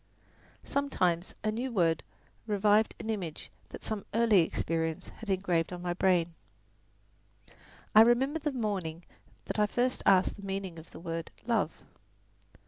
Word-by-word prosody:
Sometimes 185 Hz, -11 st, 0 dB
a 215 Hz, -, +1 dB
new 245 Hz, +4 st, -3 dB
word 170 Hz, -7 st, +2 dB, 0.5 s
revived 210 Hz, +1 st, +3 dB
an 225 Hz, -, -3 dB
image 180 Hz, -8 st, -5 dB, 0.2 s
that -, -, -10 dB
some 215 Hz, -2 st, -3 dB
earlier 225 Hz, -6 st, +5 dB
experience 160 Hz, 0 st, -2 dB
had 225 Hz, -, -11 dB
engraved 180 Hz, -4 st, +1 dB
on 180 Hz, 0 st, -6 dB
my 175 Hz, -1 st, -1 dB
brain. 175 Hz, -2 st, +2 dB, 1.6 s
I 215 Hz, -, +9 dB
remember 260 Hz, +7 st, +4 dB
the 300 Hz, -1 st, -1 dB
morning 190 Hz, -9 st, -3 dB, 0.4 s
that -, -, -3 dB
I 210 Hz, -, +4 dB
first 245 Hz, +4 st, 0 dB
asked 190 Hz, +1 st, +4 dB
the 200 Hz, -, -11 dB
meaning 190 Hz, -3 st, -4 dB
of 160 Hz, -, -13 dB
the -, -, -11 dB
word, 165 Hz, -1 st, -4 dB, 0.2 s
"love." 235 Hz, -1 st, 0 dB
195 Hz, 140 wpm, -30 LUFS, 170-225 Hz, 1.6 s, I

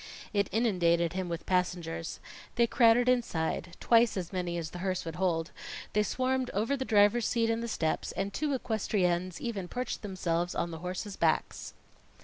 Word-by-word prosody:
It 200 Hz, -2 st, +1 dB
inundated 175 Hz, -6 st, +2 dB
him 185 Hz, -1 st, -3 dB
with 170 Hz, -1 st, -4 dB
passengers. 175 Hz, -3 st, -1 dB, 0.4 s
They 235 Hz, -, +4 dB
crowded 235 Hz, +1 st, +4 dB
inside 175 Hz, -8 st, 0 dB
twice 230 Hz, -2 st, +4 dB
as 180 Hz, 0 st, -4 dB
many 175 Hz, -2 st, -2 dB
as 160 Hz, -2 st, -4 dB
the 180 Hz, -, -7 dB
hearse 185 Hz, -1 st, -2 dB
would 165 Hz, -1 st, -5 dB
hold 170 Hz, -3 st, 0 dB, 0.4 s
they 210 Hz, -, +3 dB
swarmed 255 Hz, +3 st, 0 dB
over 225 Hz, +7 st, +1 dB
the 265 Hz, -, -2 dB
driver's 210 Hz, +1 st, +4 dB
seat 230 Hz, -1 st, +1 dB
and 230 Hz, 0 st, -1 dB
the 235 Hz, -, -3 dB
steps; 160 Hz, -8 st, -1 dB
and 195 Hz, 0 st, -3 dB
two 300 Hz, -1 st, -1 dB
equestriennes 185 Hz, -6 st, 0 dB
even 205 Hz, -6 st, -3 dB
perched 250 Hz, +5 st, -4 dB
themselves 175 Hz, -3 st, -1 dB
on 170 Hz, -, -1 dB
the 160 Hz, -, -6 dB
horses' 185 Hz, +3 st, -5 dB
backs. 160 Hz, -2 st, 0 dB
190 Hz, 170 wpm, -30 LUFS, 175-230 Hz, 0.4 s, They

